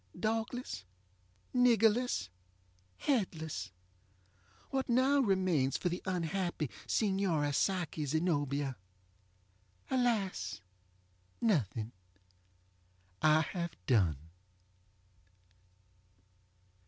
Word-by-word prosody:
Dogless, 225 - -2 0.7
niggerless, 235 - +3 0.7
headless, 165 - -1 1.0
what 265 -1 -1
now 260 +4 +4
remains 185 - +2
for 180 - -1
the 175 +1 -3
unhappy 175 -4 -1 0.2
Signora 190 -8 +1
Psyche 175 -1 0
Zenobia? 145 -4 0 1.1
AlasŌĆönothing! 100 - -2 1.3
I 155 0 +5
have 170 0 -3
done. 90 - +3
170 Hz, 55 wpm, -33 LUFS, 130-220 Hz, 1.3 s, I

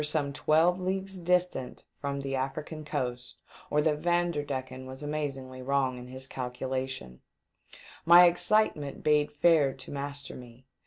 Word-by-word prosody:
449 150 -2 0
some - - -11
twelve 165 +4 +4
leaofues 190 0 -3
distant 180 -7 0 0.2
from 140 -1 -3
the 135 0 -4
African 135 +4 -4
coast 125 -4 -4 0.3
or 150 0 +2
that 150 -2 +1
Vanderdecken 145 -7 -1
was 130 +2 -8
amazingly 135 -4 -4
wrong 130 -1 0
in 125 - -9
his 130 +1 -7
calculations. 130 - -4 0.8
My 175 +2 +9
excitement 175 -4 +1
bade 150 -1 +3
fair 150 -2 +4
to 130 - -11
master 140 0 -5
me. 125 0 -12
140 Hz, 140 wpm, -29 LUFS, 130-160 Hz, 0.8 s, My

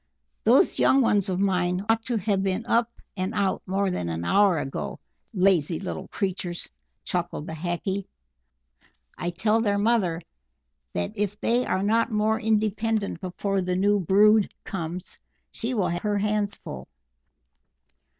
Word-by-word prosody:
"Those - - +4
young 270 - +5
ones 205 -5 +2
of 185 -1 -1
mine 185 -1 +1
ought 225 0 +3
to 240 -2 0
have 200 -1 0
been 195 +3 -1
up 235 -1 +2 0.3
and 185 +3 -3
out 200 -2 0
more 195 +1 0
than 90 - -2
an 85 +1 -3
hour 195 - +4
ago, 135 -2 -4 0.3
lazy 180 - +2
little 190 0 -5
creatures!" 185 -3 -3 0.4
chuckled 175 -4 -3
the 160 - -6
Hackee. 175 +4 -3 1.1
"I 175 - -3
tell 210 +6 +1
their 205 -2 +1
mother 200 -6 +2 0.7
that 85 0 -2
if 205 0 -2
they 240 +2 +1
are 190 - 0
not 225 +4 +2
more 215 +1 +1
independent 220 0 0
before 195 +1 -1
the 180 0 -1
new 205 +2 +3
brood 205 +3 +4
comes, 175 0 -5 0.3
she 245 +3 -3
will 200 -5 +1
have 175 0 -2
her 210 -1 0
hands 210 0 0
full." 65 -1 -9
195 Hz, 150 wpm, -25 LUFS, 180-215 Hz, 1.1 s, young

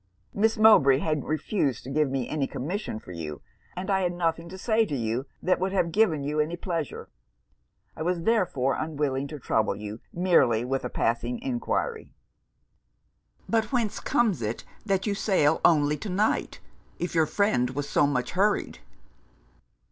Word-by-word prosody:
Miss 220 +2 +2
Mowbray 210 -12 +6
had 155 -1 -1
refused 150 - -1
to 130 - -7
give 150 0 +2
me 130 -2 -2
any 145 -3 -1
commission 170 - -4
for 100 - -11
you; 75 -5 -6 0.3
and 185 +1 -4
I 190 0 +2
had 180 -1 0
nothing 170 -1 -1
to 190 - -8
say 220 +3 +2
to 175 -10 -3
you 120 +2 -2 0.2
that 185 - +2
would 190 +1 -1
have 170 -3 +1
given 165 -8 +2
you 150 +2 -2
any 155 +3 0
pleasure. 165 -4 -4 0.9
I - - -8
was, 170 +1 -1
therefore, 175 - +1
unwilling 145 -3 -2
to 150 - -7
trouble 110 -4 0
you 105 +1 -7
merely 130 -11 +3
with 135 +1 -2
a 125 - -3
passing 120 +1 -1
enquiry.' 275 - -2 1.3
'But 225 -2 0
whence 230 -5 0
comes 215 - +1
it 110 +1 -3 0.2
that 195 -2 +1
you 205 - 0
sail 185 -7 +2
only 150 -2 +4
to 200 - -6
night, 205 +4 0 0.4
if 175 - -3
your 160 -2 +3
friend 175 -13 +1
was 140 +2 -4
so 145 - +3
much 130 -3 -1
hurried?' 200 - 0
155 Hz, 165 wpm, -26 LUFS, 135-195 Hz, 1.3 s, Mowbray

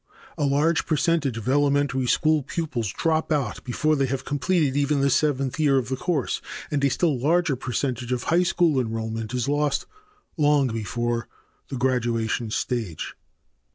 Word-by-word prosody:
A 145 - 0
large 150 +4 +2
percentage 155 -5 +1
of 115 - -6
elementary 140 -1 +2
school 155 +3 +3
pupils 135 - -3
drop 160 -1 0
out 140 -8 -1
before 155 +5 +1
they 135 -2 +1
have 130 0 -3
completed 145 -1 +1
even 145 0 +2
the 140 0 +2
seventh 135 -1 +1
year 145 -3 +4
of 130 -1 -1
the 130 - 0
course, 160 -2 -1 0.3
and 145 -2 0
a 140 - +4
still 150 -1 +1
larger 160 +2 +2
percentage 125 -1 -3
of 125 -1 -1
high 170 +2 +3
school 170 -5 +2
enrollment 110 -1 -4
is 125 0 -1
lost 145 0 0 0.5
long 145 -3 +3
before 120 +2 -2 0.4
the 135 - -5
graduation 120 -3 0
stage. 110 -7 -3
135 Hz, 155 wpm, -24 LUFS, 120-150 Hz, 0.5 s, year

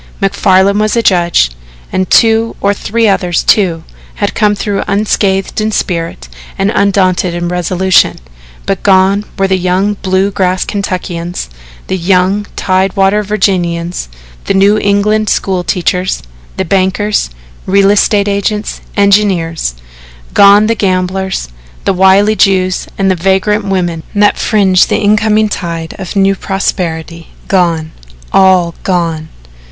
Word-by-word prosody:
MacFarlan 195 0 +2
was 215 +1 0
a 230 - +1
judge, 175 - +2 0.4
and 185 0 -1
two 225 0 +3
or 200 0 +1
three 225 +2 -1
others, 180 -4 0
too, 175 -6 +2 0.3
had 205 - -2
come 210 -2 +1
through 200 -1 -2
unscathed 200 -1 0
in 215 0 -1
spirit 165 - -3 0.3
and 195 +2 0
undaunted 185 -3 +1
in 175 0 -3
resolution 180 +1 +1 0.5
but 195 -2 -2
gone 195 +1 +3
were 195 - +1
the 190 -1 0
young 185 +3 0
Bluegrass 190 -1 0
Kentuckians, 180 - -4 0.3
the 190 - -2
young 190 +3 +1
Tide 185 0 0
water 195 +1 +2
Virginians, 175 - -1 0.4
the - - 0
New 200 +2 +3
England 210 +1 +1
school 185 -2 -1
teachers, 180 - -1 0.3
the 190 - -1
bankers, 190 - 0 0.4
real 195 +1 +3
estate 205 0 +2
agents, 205 +1 -2 0.2
engineers; 195 - +1 0.6
gone 200 +1 +6
the 225 - +1
gamblers, 185 - -2 0.4
the - - +2
wily 190 +3 +4
Jews 185 -3 +1
and 195 -1 +1
the - - +1
vagrant 195 +4 0
women 175 -4 -2
that 205 0 +2
fringe 195 -4 +2
the - - 0
incoming 215 0 +2
tide 165 -4 -5
of 190 0 -6
a - - +2
new 195 0 +3
prosperity 170 -4 -4 0.2
gone 170 -4 0 0.4
all 185 -3 +3
gone! 165 -4 -2
190 Hz, 130 wpm, -11 LUFS, 180-205 Hz, 0.6 s, gone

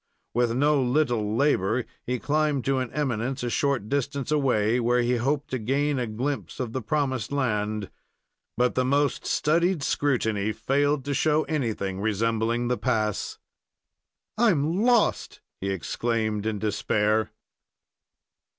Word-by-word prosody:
With 120 -1 +1
no 145 +2 +3
little 120 -5 +1
labor, 125 -4 +2 0.2
he 125 +1 0
climbed 150 0 0
to 135 -1 +1
an 130 -2 -3
eminence 130 -2 -2
a 120 - -2
short 140 -7 0
distance 140 +2 -2
away, 125 -6 +2
where 120 +1 +2
he 120 +1 +1
hoped 140 +4 -1
to 130 - -1
gain 140 +5 0
a 120 - -1
glimpse 130 +7 -4
of 120 -3 -3
the 130 - -2
promised 130 -2 -1
land; 105 - -1 0.7
but 125 +1 +2
the 130 - +1
most 140 +2 +1
studied 170 +1 +1
scrutiny 110 -8 0
failed 140 +5 0
to 140 - -1
show 155 +2 +2
anything 110 -10 -2
resembling 115 +3 0
the 125 -2 0
pass. 110 -3 -1 1.0
"I'm 175 -5 +2
lost!" 240 -3 +2 0.2
he 100 - -3
exclaimed, 110 +2 -1
in 110 -1 -1
despair. 105 +1 +1
125 Hz, 135 wpm, -26 LUFS, 110-145 Hz, 1.0 s, no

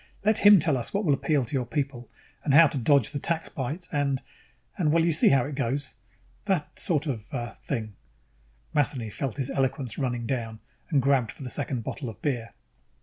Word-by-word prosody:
Let 215 +1 +4
him 205 -1 +8
tell 155 -3 +2
us 120 +9 -4
what 200 +1 0
will 145 - +4
appeal 140 -1 +1
to 115 - -10
your 130 -3 0
people, 135 -3 -3 0.3
and 140 -2 +2
how 165 +2 +9
to 140 -2 -1
dodge 140 +4 +3
the 145 - -3
tax 165 +2 -2
bite 150 +7 -4
and 140 -2 0 0.6
and 165 -7 +1
well, 165 +1 +3
you 170 - +3
see 160 - +4
how 135 -3 +4
it 145 - -5
goes, 135 +1 -2 0.5
that 190 -7 -1
sort 160 -5 +1
of, 115 -8 -4
uh, 120 -3 -4
thing." 110 -2 -3 0.8
Matheny 125 -6 0
felt 130 +5 -4
his 135 -1 -2
eloquence 130 -3 -1
running 120 -3 -1
down 115 -4 -3 0.3
and 145 -6 +2
grabbed 135 -4 +3
for - - -11
the 125 - -4
second 135 -4 -2
bottle 130 +2 -5
of 110 - -10
beer. 120 -6 -3
140 Hz, 205 wpm, -27 LUFS, 120-150 Hz, 0.8 s, how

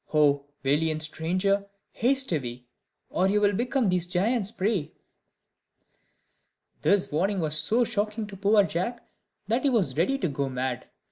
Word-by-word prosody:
Oh 145 -2 +4 0.2
valiant 155 +3 +1
stranger! 185 +6 0 0.2
haste 265 +1 +1
away, 125 -6 -3 0.5
Or 185 - +2
you'll 205 0 +3
become 245 +3 0
these 180 -1 0
giants' 200 +4 +1
prey." 205 -6 -1 1.9
This 200 -4 +2
warning 190 +6 0
was 155 -2 -1
so 230 +9 +2
shocking 215 -1 -2
to 205 -1 -10
poor 205 +2 +4
Jack, 195 +7 -3 0.4
that 230 +4 +1
he 285 - +2
was 225 -8 +1
ready 190 +12 +2
to 185 - -1
go 140 -2 -2
mad. 130 -1 -3
190 Hz, 140 wpm, -27 LUFS, 155-215 Hz, 1.9 s, Oh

